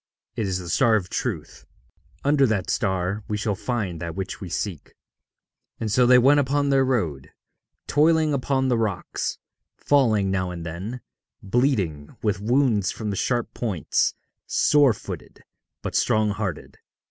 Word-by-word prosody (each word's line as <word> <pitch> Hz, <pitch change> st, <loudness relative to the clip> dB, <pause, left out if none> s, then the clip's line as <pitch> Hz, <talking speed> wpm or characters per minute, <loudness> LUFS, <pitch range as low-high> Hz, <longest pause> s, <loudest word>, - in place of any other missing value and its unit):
It 110 Hz, -, -1 dB
is 95 Hz, -1 st, -1 dB
the 90 Hz, -2 st, -7 dB
star 115 Hz, +6 st, +3 dB
of 95 Hz, -4 st, -2 dB
Truth. -, -, -4 dB, 0.6 s
Under 140 Hz, -1 st, +4 dB
that 100 Hz, -5 st, -1 dB
star 95 Hz, -1 st, -1 dB
we 105 Hz, -, -2 dB
shall 105 Hz, 0 st, -1 dB
find 100 Hz, -6 st, -3 dB
that 85 Hz, -1 st, -5 dB
which 95 Hz, 0 st, -5 dB
we 95 Hz, -, -6 dB
seek.' 85 Hz, -2 st, -4 dB, 0.8 s
And 110 Hz, -2 st, -2 dB
so 125 Hz, +3 st, +4 dB
they 125 Hz, 0 st, +7 dB
went 135 Hz, +4 st, +5 dB
upon 140 Hz, +1 st, +1 dB
their 135 Hz, -1 st, +4 dB
road, 90 Hz, -, -1 dB, 0.6 s
toiling 155 Hz, +1 st, +3 dB
upon 135 Hz, 0 st, 0 dB
the 120 Hz, -3 st, +2 dB
rocks, 105 Hz, -5 st, -2 dB, 0.4 s
falling 110 Hz, -9 st, +2 dB
now 95 Hz, -1 st, -1 dB
and 85 Hz, -2 st, -6 dB
then, 95 Hz, +9 st, -6 dB, 0.4 s
bleeding 95 Hz, -, 0 dB
with 105 Hz, -3 st, 0 dB
wounds 115 Hz, -3 st, +2 dB
from 105 Hz, -2 st, -4 dB
the -, -, -3 dB
sharp 120 Hz, +4 st, -1 dB
points, 100 Hz, -, 0 dB, 0.3 s
sore 145 Hz, -5 st, +4 dB
footed, -, -, -9 dB, 0.4 s
but -, -, -4 dB
strong 110 Hz, -1 st, +2 dB
hearted. 100 Hz, -5 st, -5 dB
110 Hz, 150 wpm, -24 LUFS, 95-130 Hz, 0.8 s, they